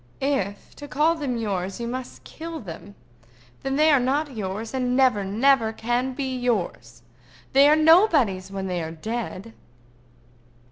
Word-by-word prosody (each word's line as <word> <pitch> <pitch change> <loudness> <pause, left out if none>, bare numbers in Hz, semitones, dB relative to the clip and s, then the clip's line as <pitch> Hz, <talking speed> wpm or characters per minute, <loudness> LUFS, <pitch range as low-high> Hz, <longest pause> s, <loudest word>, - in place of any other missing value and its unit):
"If, 205 -8 -2
to 290 - -9
call 305 +3 +2
them 285 -7 -3
yours, 195 -3 -3
you 235 - -3
must 255 +1 -6
kill 330 0 -8
them, 200 +1 -10 0.7
then 270 0 -2
they 310 +2 +4
are 285 - +5
not 275 +2 -1
yours, 215 +3 -5
and 250 -1 0
never, 255 -7 +3
never 225 +3 +2
can 240 +4 -1
be 265 -1 -3
yours. 185 - -3 0.5
They 280 +2 +7
are 305 - +6
nobody's 310 - +4
when 195 -1 -5
they 180 -2 -2
are 160 - -4
dead." 220 +4 -5
245 Hz, 150 wpm, -24 LUFS, 200-275 Hz, 0.7 s, They